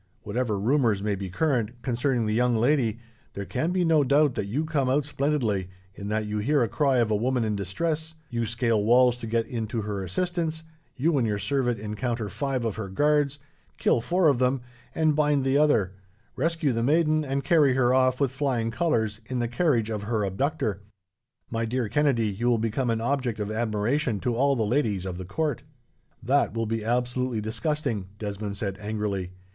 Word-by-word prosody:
Whatever 110 -1 -1
rumours 115 -3 +2
may 105 -1 0
be 95 -1 -4
current, 120 - 0
concerning 125 -1 0
the 105 - 0
young 120 +1 +2
lady, 120 -2 +2 0.4
there 100 - -5
can 160 - -1
be 180 -1 +1
no 160 -3 +4
doubt 140 +1 +3
that 100 - -3
you 140 +10 -1
come 145 -5 0
out 140 +2 +2
splendidly, 130 -10 -1 0.2
in 100 +1 -7
that 110 +1 -1
you 105 0 -2
hear 140 +5 +2
a - - +1
cry 135 +3 +1
of 115 -3 +2
a - - +3
woman 125 +3 +1
in 110 -1 -1
distress; 160 - -2
you 115 -3 -2
scale 115 -2 +1
walls 125 +2 +5
to 115 - -7
get 115 0 0
in 115 -2 -4
to 110 0 -3
her 100 -2 -3
assistance; 165 - -2 0.3
you 155 +5 +2
and 115 - +1
your 105 -1 0
servant 120 +1 0
encounter 110 +1 -3
five 135 -2 -2
of 110 -2 -2
her 105 -3 -4
guards, 145 +5 +2 0.4
kill 115 - +2
four 175 +6 +2
of 140 -5 +3
them 130 0 +1 0.3
and 155 -2 +2
bind 145 -2 +2
the 135 0 +2
other; 140 -11 +3 0.4
rescue 160 0 +1
the 115 -1 -1
maiden, 155 +4 +2
and 140 -1 -2
carry 140 -3 +4
her 125 -1 +3
off, 130 -1 +3
with 140 -3 +1
flying 130 -5 -1
colours, 110 -7 0
in 130 - -3
the 120 -1 0
carriage 120 -4 +1
of 105 -2 -2
her 110 0 -1
abductor. 110 - -1 0.7
My 115 0 -1
dear 120 +1 -1
Kennedy, 125 -3 +2
you 105 +5 -2
will 120 -1 +4
become 115 +3 -1
an 115 -1 0
object 125 -3 -1
of 105 0 -3
admiration 110 +2 0
to 125 - 0
all 140 +3 +3
the 115 - 0
ladies 105 -6 0
of 90 -1 -5
the 95 - -6
court." 150 - -2 0.6
"That 140 0 +2
will 115 0 0
be 110 0 -2
absolutely 125 +1 0
disgusting," 110 - -2
Desmond 105 -1 -4
said, 100 -1 -4
angrily. 105 -3 -3
120 Hz, 195 wpm, -26 LUFS, 110-140 Hz, 0.7 s, walls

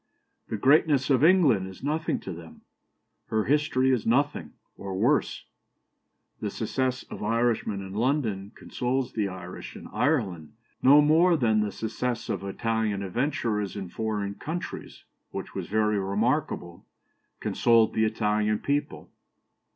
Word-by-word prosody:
The 110 - -3
greatness 140 +3 +3
of 135 +1 +3
England 155 - +5
is 95 +5 -12
nothing 155 +3 -1
to 95 - -6
them. 80 -1 -12 0.7
Her 110 -1 0
history 135 -1 +2
is 125 -4 +1
nothing, 140 +5 0 0.2
or 95 -1 -6
worse. - - +1 0.9
The - - -2
success 130 -1 -2
of - - -7
Irishmen 115 -2 0
in 95 0 -8
London 110 -4 -1
consoles 125 +1 -2
the 105 -3 0
Irish 90 -1 -8
in - - -9
Ireland 100 - -1 0.3
no 145 +3 +7
more 165 +3 +4
than 110 -5 +2
the 105 -1 0
success 115 +3 -3
of - - -2
Italian 110 0 -1
adventurers 115 -2 -1
in 95 -3 -5
foreign 105 0 -3
countries 165 +11 -6 0.3
(which - - -7
was - - -5
very 105 -1 +1
remarkable) 100 - -1 0.6
consoled 115 -2 +3
the 110 - +2
Italian 105 -1 +1
people. 145 +5 -3
115 Hz, 135 wpm, -27 LUFS, 100-135 Hz, 0.9 s, no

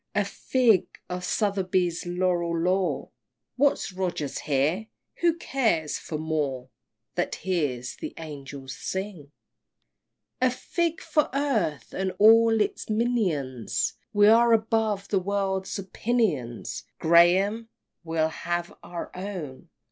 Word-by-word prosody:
A 205 -1 +2
fig 225 +1 +2 0.2
for 180 0 -4
Southey's 185 -3 0
Laureat 175 -2 0
lore!" 185 +1 0 0.5
What's 275 -7 +1
Rogers 180 -6 -2
here? 155 +9 0 0.3
Who 340 -1 +2
cares 220 - 0
for 155 - -5
Moore 145 -5 -2 0.4
That - - -1
hears 145 -10 -2
the - - -7
Angels 140 -4 -8
sing! 190 -7 -5 0.5
" - - -54
XVI. 255 - +5
A - - +3
fig 335 +6 -2
for 300 -2 +1
earth, 220 - 0
and 190 0 -2
all 225 +1 +6
its 210 - -2
minions! 170 - 0 0.2
We 205 0 +5
are 230 +2 +6
above 220 -2 +1
the 195 - +2
world's 190 0 -1
opinions, 190 - -1
Graham! 185 +7 +4 0.3
we'll 160 -1 0
have 175 +1 -3
our 175 -1 -7
own! 180 -8 -6
185 Hz, 120 wpm, -26 LUFS, 160-220 Hz, 0.5 s, all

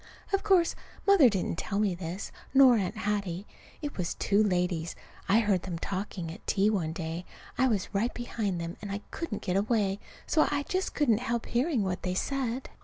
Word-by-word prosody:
Of 390 - +3
course 375 -5 +4 0.3
Mother 390 -11 +7
didn't 190 -4 -1
tell 200 - -2
me 205 -3 +2
this, 175 +2 -5 0.2
nor 265 -2 +8
Aunt 195 -5 -1
Hattie. 200 -2 -2 0.4
It 290 - -4
was 175 - -1
two 200 +1 +2
ladies. 180 -4 0 0.3
I 215 +4 +6
heard 200 -5 +2
them 175 -2 -4
talking 185 -2 -4
at 170 - -8
a - - -27
tea 205 +2 +3
one 170 -7 0
day. 165 +1 -4 0.3
I 260 +2 +3
was 210 -5 -1
right 220 +5 +1
behind 215 -6 -3
them, 170 +1 -5
and 205 -1 -5
I 200 +1 -3
couldn't 325 -11 -4
get 185 -1 0
away, 205 -2 +1 0.3
so 310 - +3
I 285 0 0
just 370 +5 -2
couldn't 235 -8 +3
help 235 -2 -2
hearing 250 -1 +1
what 185 -1 -2
they 180 0 -2
said. 260 +2 -2
205 Hz, 195 wpm, -29 LUFS, 185-245 Hz, 0.4 s, nor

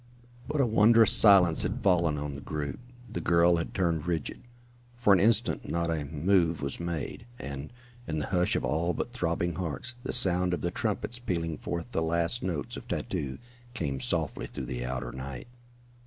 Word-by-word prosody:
But 150 0 -2
a - - +4
wondrous 115 0 +5
silence 95 -6 +6
had - - -2
fallen 85 -5 +3
on 75 0 -4
the 70 - -8
group. 75 -3 -4 0.3
The 85 - -5
girl 85 +1 +4
had 85 - -4
turned 85 -4 0
rigid. 80 -5 -3 0.6
For 110 -5 +4
an 95 - +5
instant 115 +2 +1
not 85 0 0
a 75 -3 -2
move 85 +2 +1
was 70 - -2
made, 85 - -4
and, 70 - -7 0.4
in 80 - -2
the 75 - -1
hush 90 -2 +1
of - - 0
all 85 +3 0
but 120 - -4
throbbing 85 -6 -1
hearts, 90 - -3
the - - -4
sound 90 -6 +5
of - - -8
the 85 - -1
trumpets 115 +1 -2
pealing 85 -9 -3
forth 85 +8 -5
the 80 - 0
last 85 +7 0
notes 85 -6 -3
of - - -10
tattoo 65 -2 -3 0.4
came 70 - -2
softly - - -2
through - - -6
the - - -4
outer 65 +1 -4
night. 65 - -7
85 Hz, 185 wpm, -29 LUFS, 75-100 Hz, 0.6 s, silence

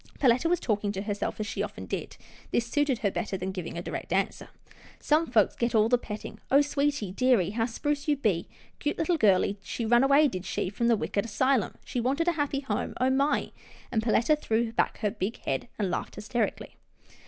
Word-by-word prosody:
Perletta 255 +4 +3
was 355 -1 +2
talking 205 -2 0
to 195 0 -4
herself, 205 0 -3
as 215 - -1
she - - -3
often - - -5
did. - - -5 0.3
This 235 - +1
suited 285 +1 +1
her 200 - +3
better 200 -2 -3
than 185 +1 -3
giving 180 -3 -5
a 170 - -4
direct - - -5
answer. 195 +2 -1 0.3
" - - -21
Some 310 +2 +2
folks 220 -7 +3
gits 235 -1 0
all 220 0 +4
the 245 0 +4
pettin' 210 -3 -7
— - - -39
Oh! 280 +2 +7
sweetie, 285 -7 0
dearie, 225 -4 +2
how 225 +1 0
spruce 290 +5 -2
you 300 - +3
be 200 -10 0
— - - -30
'cute 295 - -1
little 340 +2 +1
girlie 200 -4 +3
— - - -36
she 235 - -2
run 240 +3 +5
away, 280 +2 +5
did 185 -8 -4
she, 185 -1 -2
from 235 +4 0
the 235 -2 +4
wicked 205 +2 -2
'sylum. 260 0 +1
She 250 - -3
wanted 280 +8 0
a - - +5
happy 290 -3 -1
home. 270 - -3
Oh, 255 +1 +3
my! 275 +3 +1 0.2
" - - -22
and 220 - +1
Per 220 0 0
letta 270 +9 +4
threw 230 -5 0
back - - 0
her 210 -2 +1
big 215 +1 -3
head, 135 - -2
and 195 -4 -1
laughed - - -3
hys 210 +1 -8
terically. 240 0 -1
235 Hz, 235 wpm, -28 LUFS, 205-280 Hz, 0.3 s, Oh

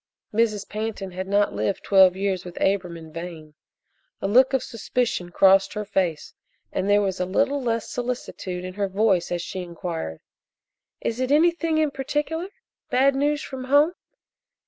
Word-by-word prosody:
Mrs. 215 -2 +1
Pantin 210 -3 -4
had 185 +1 -5
not 205 +1 +2
lived 195 - -2
twelve 190 -2 +6
years 190 -1 -1
with 180 -1 -9
Abram 180 -3 0
in 160 -1 -12
vain. 165 -2 -8 0.7
A - - -2
look 255 +6 +5
of 265 -2 +1
suspicion 230 -5 -2
crossed 195 +2 +4
her 210 0 -4
face, 175 -6 -1 0.4
and 195 - -1
there 205 0 +4
was 190 -1 -2
a 180 - +1
little 280 +8 +1
less 230 -3 -1
solicitude 235 -7 -4
in 185 - -6
her 200 +1 -1
voice 190 -3 +1
as 175 -1 -1
she 185 - -5
inquired: 170 - -5 0.8
"Is 230 +1 -2
it 255 +1 0
anything 330 +1 +3
in 310 -2 +2
particular? 295 +6 -2 0.4
Bad 270 +2 +4
news 290 +2 0
from 260 -2 -6
home?" 290 +5 +4
205 Hz, 165 wpm, -24 LUFS, 185-255 Hz, 0.8 s, twelve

